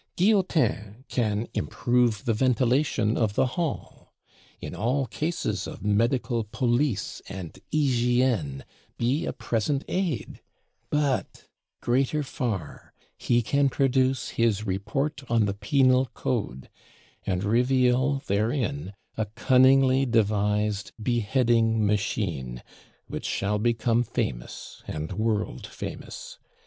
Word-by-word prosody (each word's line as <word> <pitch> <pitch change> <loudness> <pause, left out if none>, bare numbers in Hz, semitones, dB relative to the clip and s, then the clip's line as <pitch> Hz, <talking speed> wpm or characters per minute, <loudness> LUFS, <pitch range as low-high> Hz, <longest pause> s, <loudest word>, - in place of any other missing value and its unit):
Guillotin 165 - +1
can 110 -2 0
improve 120 -4 +1
the 115 - +2
ventilation 125 -1 +2
of 105 -3 0
the - - +3
Hall; 170 -4 -4 0.5
in - - -7
all 130 +5 0
cases 160 +6 -2
of - - -8
medical 115 +3 +1
police 120 +1 -1
and 95 -4 -7
hygiène 120 - +1 0.3
be 135 +8 0
a - - 0
present 120 +4 -1
aid: 175 - -2 0.5
but 145 -3 -1 0.4
greater 135 +5 +1
far, 105 - -4 0.2
he 120 0 +1
can 140 +4 +2
produce 130 -1 +1
his 110 -2 +1
'Report 110 +10 -2
on 115 -2 +3
the 100 - -1
Penal 130 +5 +3
Code,' 65 +1 -3 0.6
and 90 0 0
reveal 125 +4 +2
therein 120 +3 -1 0.2
a 110 - -1
cunningly 130 +4 +4
devised 105 -2 +1
Beheading 115 -1 +2
Machine, 95 - -1 0.4
which - - -6
shall 105 +1 0
become 115 +1 +2
famous - - -4
and 75 0 -4
world 110 -1 -1
famous. - - -8
120 Hz, 105 wpm, -26 LUFS, 105-130 Hz, 0.6 s, cunningly